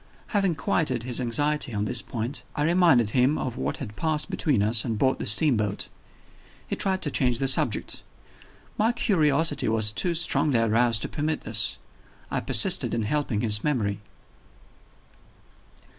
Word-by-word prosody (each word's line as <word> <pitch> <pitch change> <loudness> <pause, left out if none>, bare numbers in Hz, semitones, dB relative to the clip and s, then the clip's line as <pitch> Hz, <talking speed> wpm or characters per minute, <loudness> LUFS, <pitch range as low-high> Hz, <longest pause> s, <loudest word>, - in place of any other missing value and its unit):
Having 195 -5 0
quieted 140 -4 -1
his 125 +1 -2
anxiety 145 +1 -1
on 105 0 -1
this 120 +1 0
point, 120 +4 -5
I 145 - -1
reminded 165 - +3
him 130 +5 +2
of 125 -2 -4
what - - -3
had 105 -6 -8
passed 155 +5 -1
between 130 -10 0
us 110 +1 +2
on 115 -3 -3
board 130 +4 0
the - - -3
steamboat. 105 -4 +2 0.8
He - - -3
tried 190 -1 0
to 150 - -1
change 125 -3 +1
the 135 - -1
subject. 130 - +1 0.8
My 225 +3 +2
curiosity 160 - +1
was 110 -1 +3
too 170 +10 -1
strongly 150 -5 +1
aroused 115 0 +1
to - - -2
permit 155 0 -3
this; 110 -2 +1 0.5
I - - -1
persisted - - +2
in 115 - -1
helping 125 -3 -1
his 105 -2 +1
memory. 110 -9 -1
130 Hz, 155 wpm, -25 LUFS, 110-150 Hz, 0.8 s, reminded